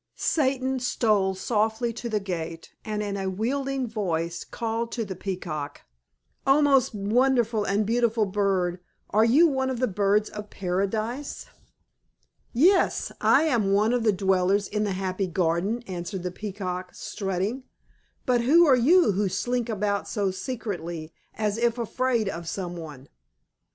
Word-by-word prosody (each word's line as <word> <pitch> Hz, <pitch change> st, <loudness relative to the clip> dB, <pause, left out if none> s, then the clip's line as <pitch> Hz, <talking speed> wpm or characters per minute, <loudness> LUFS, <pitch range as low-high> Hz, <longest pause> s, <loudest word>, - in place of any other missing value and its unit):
Satan 265 Hz, -3 st, 0 dB
stole 210 Hz, -6 st, +1 dB
softly 220 Hz, +3 st, 0 dB
to 235 Hz, +1 st, -5 dB
the 215 Hz, -2 st, 0 dB
gate 165 Hz, -4 st, -5 dB
and 210 Hz, -1 st, -3 dB
in 200 Hz, -1 st, -3 dB
a 190 Hz, -1 st, -2 dB
wheedling 265 Hz, +6 st, -1 dB
voice 170 Hz, -6 st, -2 dB
called 230 Hz, 0 st, -3 dB
to 230 Hz, -2 st, -2 dB
the 190 Hz, -2 st, -6 dB
Peacock, 155 Hz, -7 st, -5 dB, 0.7 s
"O 270 Hz, +2 st, +6 dB
most 275 Hz, -6 st, +3 dB
wonderful 230 Hz, +1 st, +2 dB
and 205 Hz, +2 st, +1 dB
beautiful 230 Hz, 0 st, +2 dB
bird! 190 Hz, -3 st, 0 dB, 0.3 s
Are 215 Hz, +2 st, +4 dB
you 265 Hz, +9 st, +6 dB
one 265 Hz, -3 st, 0 dB
of 255 Hz, -2 st, -3 dB
the 255 Hz, -, +3 dB
birds 205 Hz, 0 st, +1 dB
of 210 Hz, -1 st, -7 dB
Paradise?" 215 Hz, +8 st, -2 dB, 1.1 s
"Yes, 360 Hz, +10 st, +3 dB
I -, -, +5 dB
am 230 Hz, -11 st, +2 dB
one 215 Hz, +4 st, +3 dB
of 245 Hz, -, +1 dB
the 220 Hz, -1 st, +3 dB
dwellers 190 Hz, +1 st, +1 dB
in 210 Hz, 0 st, -1 dB
the 200 Hz, -, -1 dB
happy 190 Hz, 0 st, -2 dB
garden," 180 Hz, +6 st, 0 dB
answered 180 Hz, 0 st, -5 dB
the 180 Hz, -, -3 dB
Peacock, 185 Hz, -2 st, -5 dB
strutting. 200 Hz, +6 st, -3 dB, 0.6 s
"But 245 Hz, -2 st, +2 dB
who 320 Hz, +8 st, +6 dB
are 275 Hz, -4 st, +6 dB
you 305 Hz, -, +5 dB
who 200 Hz, 0 st, 0 dB
slink 240 Hz, +5 st, -1 dB
about 205 Hz, -2 st, -1 dB
so 200 Hz, -4 st, -1 dB
secretly, 175 Hz, -, -5 dB, 0.2 s
as 215 Hz, 0 st, -1 dB
if 235 Hz, 0 st, +1 dB
afraid 240 Hz, -1 st, 0 dB
of 170 Hz, -3 st, -4 dB
some 180 Hz, -3 st, -4 dB
one?" 150 Hz, -5 st, -9 dB
210 Hz, 150 wpm, -26 LUFS, 190-240 Hz, 1.1 s, O